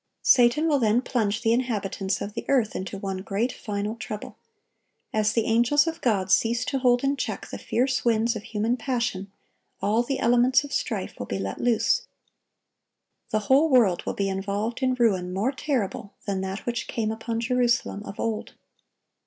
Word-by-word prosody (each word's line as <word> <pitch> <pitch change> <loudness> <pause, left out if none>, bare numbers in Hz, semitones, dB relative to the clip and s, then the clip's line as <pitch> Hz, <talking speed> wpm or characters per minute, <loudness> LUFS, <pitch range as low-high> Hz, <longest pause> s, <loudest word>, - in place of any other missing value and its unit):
Satan 245 +6 +5
will 290 -3 +3
then 230 +1 +2
plunge 220 -3 -1
the 225 -1 +3
inhabitants 205 -5 -1
of 205 - -5
the - - -4
earth 245 -6 +2
into 190 +1 -4
one 195 -1 -4
great, 205 +6 -1
final 210 -2 -4
trouble. 215 -2 -7 0.8
As 215 0 +2
the 230 -2 +1
angels 240 +7 +3
of 330 -1 -4
God 195 -6 +1
cease 230 +4 +3
to 270 - -1
hold 245 -1 +3
in 275 +1 +2
check - - -4
the - - -6
fierce 255 +2 0
winds 230 0 +2
of 215 - -4
human 220 +3 -1
passion, 235 -6 -2 0.5
all 215 +3 +2
the 265 +2 -2
elements 245 +3 +4
of 285 -1 -8
strife 215 -6 -2
will 100 - -5
be 100 - -2
let 95 0 -4
loose. 240 -2 +2 1.2
The 215 - 0
whole 270 +9 +4
world 230 - +4
will - - -2
be 200 - 0
involved 200 +5 -2
in 255 -1 +2
ruin 195 -7 +1
more 200 +8 0
terrible 250 -8 -3
than 195 -2 -1
that 190 +1 -5
which 240 0 -2
came 220 -2 -1
upon 225 +1 -3
Jerusalem 240 -3 +1
of 200 - -9
old. 225 -2 -3
225 Hz, 180 wpm, -25 LUFS, 200-245 Hz, 1.2 s, Satan